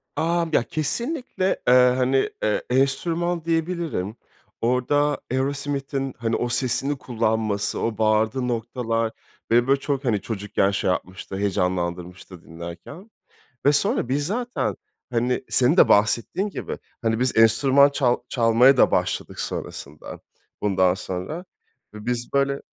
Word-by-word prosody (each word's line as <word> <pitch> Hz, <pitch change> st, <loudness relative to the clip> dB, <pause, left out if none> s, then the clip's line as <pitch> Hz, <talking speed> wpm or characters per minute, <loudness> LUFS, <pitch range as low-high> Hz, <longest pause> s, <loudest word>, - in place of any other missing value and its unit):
Amm, 170 Hz, 0 st, 0 dB
ya, -, -, +4 dB
kesinlikle, 195 Hz, -, -2 dB
eee, 125 Hz, -, +6 dB, 0.2 s
hani, 130 Hz, +1 st, +2 dB
iii, 105 Hz, -, +1 dB
enstrüman 165 Hz, +6 st, 0 dB
diyebilirim. 165 Hz, -, -2 dB, 0.5 s
Orada 145 Hz, +5 st, +1 dB
Aerosmith'in, 135 Hz, 0 st, -2 dB
hani, 115 Hz, -1 st, -1 dB
o 120 Hz, -, -1 dB
sesini 130 Hz, +3 st, 0 dB
kullanması, 110 Hz, -4 st, -1 dB
o 115 Hz, -1 st, -2 dB
bağırdığı 110 Hz, +3 st, +1 dB
noktalar 115 Hz, -1 st, -2 dB, 0.4 s
beni, 120 Hz, +2 st, +4 dB
böyle, 135 Hz, 0 st, +3 dB
çok, 140 Hz, -1 st, -2 dB
hani, 105 Hz, -5 st, +1 dB
çocukken 105 Hz, -2 st, -1 dB
şey 95 Hz, -, -1 dB
yapmıştı, 95 Hz, +1 st, -4 dB
heyecanlandırmıştı 90 Hz, -2 st, -2 dB
dinlerken 85 Hz, -, -10 dB, 0.5 s
ve 145 Hz, -, +6 dB
sonra 140 Hz, -3 st, +1 dB
biz 145 Hz, +2 st, 0 dB
zaten, 245 Hz, +5 st, -2 dB, 0.4 s
hani, 125 Hz, +2 st, 0 dB
senin 130 Hz, +7 st, +3 dB
de -, -, +6 dB
bahsettiğin 115 Hz, -, +2 dB
gibi, -, -, -5 dB, 0.2 s
hani, 115 Hz, -1 st, 0 dB
biz 125 Hz, -2 st, 0 dB
enstrüman 135 Hz, +5 st, +5 dB
çal 130 Hz, -4 st, +1 dB
çalmaya 120 Hz, +3 st, +4 dB
da -, -, +5 dB
başladık -, -, -1 dB
sonrasında. 75 Hz, +2 st, -6 dB, 0.4 s
Bundan 95 Hz, -3 st, +3 dB
sonra 95 Hz, -, -5 dB, 0.5 s
ve 105 Hz, 0 st, -10 dB
biz 120 Hz, 0 st, -2 dB
böyle 140 Hz, 0 st, +1 dB
125 Hz, 125 wpm, -23 LUFS, 110-140 Hz, 0.5 s, eee